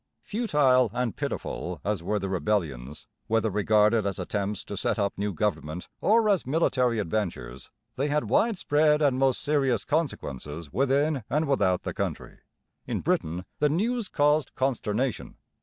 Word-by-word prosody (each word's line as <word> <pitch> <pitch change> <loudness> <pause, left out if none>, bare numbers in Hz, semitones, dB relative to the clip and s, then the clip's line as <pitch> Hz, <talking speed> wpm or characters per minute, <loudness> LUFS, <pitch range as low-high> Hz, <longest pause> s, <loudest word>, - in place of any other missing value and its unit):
Futile 145 - +2
and 125 -4 -1
pitiful 90 -2 -4
as 105 -3 -1
were 105 +5 -1
the 100 -1 -3
rebellions, 85 -9 -2 0.2
whether 115 -1 +1
regarded 105 +2 +3
as 100 -2 -2
attempts 100 -1 -3
to 100 - -7
set 100 - -1
up 100 -2 0
new 105 +1 -2
government 90 -3 -2
or 220 +1 +4
as 200 -4 +3
military 130 -4 +1
adventures, 80 - -3 0.3
they 140 +3 0
had 150 0 +1
widespread 155 -9 +3
and 140 -4 +2
most 135 -2 +2
serious 135 -6 +1
consequences 80 - -3
within 140 +1 +1
and 150 +3 +1
without 100 -10 +1
the - - -4
country. - - -4 0.5
In - - -2
Britain 85 +4 -1
the 150 - +3
news 220 +8 0
caused 150 -2 +1
consternation. 130 -2 -1
115 Hz, 145 wpm, -27 LUFS, 100-145 Hz, 0.5 s, or